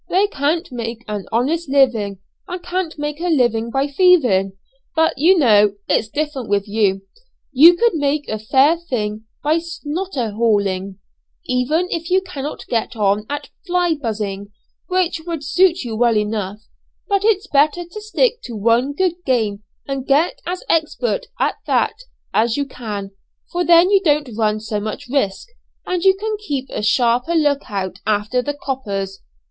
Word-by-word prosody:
They 380 +3 +3
can't 325 -2 -1
make 235 -1 -5
an 210 -2 -4
honest 285 +7 0
living, 240 -8 +2 0.3
and 360 0 -6
can't 355 -2 -3
make 295 0 -4
a 355 - -1
living 240 -8 +2
by 270 +3 0
thieving; 275 - +3 0.4
but, 320 0 +2
you 345 +7 +4
know, 210 - +4
it's 215 - +1
different 290 -3 -3
with 200 0 +1
you. 200 -2 +1 0.5
You 315 +6 +8
could 470 +5 +2
make 290 -1 0
a 215 - -3
fair 270 +9 +3
thing 220 -10 -4 0.2
by 310 +3 +2
'snotter 330 - -4
hauling,' 200 -4 0 0.5
even 300 +5 +1
if 335 0 -3
you 370 +1 +4
cannot 300 -6 -6
get 235 +1 -2
on 210 0 +1
at 290 -1 -4 0.2
'fly 350 -1 +2
buzzing,' 210 -7 -4 0.4
which 365 -3 0
would 330 -4 -4
suit 360 +2 +3
you 230 -3 -4
well 235 -1 +3
enough; 210 -1 -2 0.5
but 400 -2 +1
it's 425 -2 +2
better 305 +2 +2
to 385 +5 -9
stick 460 +2 +1
to 235 - -7
one 230 +6 +2
good 355 +1 -1
game, 220 -7 0 0.3
and 275 -1 -4
get 295 +5 +2
as 360 +1 -3
expert 325 +9 0
at - - 0
that - - +2 0.4
as 225 +2 +2
you 285 - 0
can, 210 -7 -6 0.4
for 355 0 0
then 345 +3 +6
you 395 -1 +5
don't 295 -6 +1
run 215 -1 +1
so 215 -1 -3
much 215 +3 -5
risk, 255 - -1 0.4
and 360 -1 -2
you 385 -1 +5
can 430 +2 -3
keep 285 -10 -3
a - - -3
sharper 240 +8 +2
look 290 -3 +1
out 190 -3 -4
after 215 +4 +1
the 290 +3 -3
'coppers'. 200 -9 -4
275 Hz, 165 wpm, -19 LUFS, 215-335 Hz, 0.5 s, You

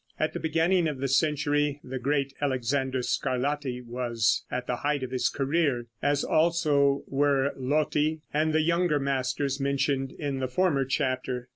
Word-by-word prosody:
At 155 - 0
the - - -3
beginning 165 +2 +2
of 150 -3 -3
the 135 +1 -2
century, 145 +1 +1
the 130 0 -5
great 140 +1 0
Alexander 130 -1 0
Scarlatti 130 0 -1
was 120 -2 0
at 125 -1 -3
the 125 - -2
height 145 +1 -1
of 130 - -5
his 130 - +1
career, 140 -3 0 0.2
as 145 0 +1
also 150 -4 +2
were 140 0 +1
Lotti 150 +3 0
and 155 +1 +2
the 155 0 +2
younger 170 -1 +2
masters 135 0 -1
mentioned 135 -1 0
in 140 -3 -3
the 130 - -1
former 140 0 +1
chapter. 130 -2 -2
140 Hz, 155 wpm, -27 LUFS, 130-150 Hz, 0.2 s, beginning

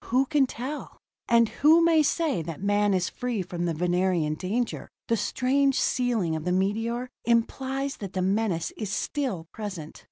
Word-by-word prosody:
Who 255 +3 +2
can 280 -1 +2
tell? 260 +5 -6 0.3
And 235 -1 +5
who 320 +8 +4
may 325 -2 +5
say 300 - +1
that 160 -1 -6
man 205 0 +2
is 180 -1 +1
free 240 -6 -3
from 175 -1 -4
the 170 - 0
Venerian 175 -2 +1
danger? 205 +9 -3 0.2
The 230 - +3
strange 270 +4 +1
sealing 230 -10 +1
of 155 - -4
the 180 - -1
meteor 225 +6 0 0.2
implies 265 +4 0
that 195 -3 -7
the 185 - -1
menace 195 -3 0
is 215 -3 -4
still 195 - -2
present. 185 -8 -7
220 Hz, 165 wpm, -26 LUFS, 180-260 Hz, 0.3 s, And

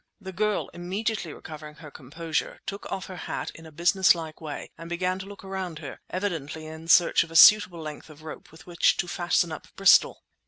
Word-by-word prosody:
The 190 -2 -8
girl, 210 +2 -1
immediately 190 +1 -3
recovering 150 -1 -10
her 150 -2 -12
composure, 155 +4 -4
took 200 +1 -6
off 190 - -4
her 185 - -9
hat - - -5
in 165 0 -13
a - - -13
businesslike 170 -1 +2
way 150 -2 -7
and 165 0 -10
began 180 +2 -1
to 190 - -8
look 200 -1 -11
around 190 -4 -5
her, 145 -4 -8
evidently 160 -5 -4
in 160 +1 -9
search 170 +1 +5
of 165 - -12
a 165 - -11
suitable 185 -2 +7
length 155 0 -8
of 155 0 -15
rope 155 - -10
with 160 0 -16
which 175 -2 +2
to 175 - -1
fasten 175 -1 0
up 160 - -8
Bristol. 195 -1 +5
170 Hz, 200 wpm, -26 LUFS, 160-190 Hz, -, suitable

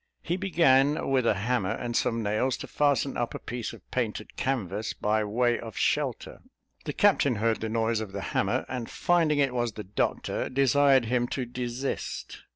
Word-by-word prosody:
He 175 - -1
began, 150 -8 +3
with 130 -3 +2
a 110 - +3
hammer 105 -1 0
and 120 -1 -4
some 115 0 +1
nails, 110 +5 0
to - - -7
fasten 140 -2 +1
up 120 - -2
a - - -2
piece 120 -1 -5
of 115 -6 -14
painted 110 -4 -3
canvas, 105 -5 -2
by 110 +1 +1
way 120 +3 +1
of 115 -3 -8
shelter. - - -1 0.4
The - - -3
captain 135 -4 +3
heard 110 +1 0
the 110 - -2
noise 115 0 0
of 110 -3 -5
the 100 0 -5
hammer, - - +1
and 125 -3 -5
finding 165 -4 +2
it 140 -3 +2
was 120 -2 -1
the 105 - -7
doctor, 100 +2 -2
desired 135 -1 +4
him 120 +1 +1
to 130 0 -3
desist. 125 +2 -4
120 Hz, 180 wpm, -27 LUFS, 110-135 Hz, 0.4 s, desired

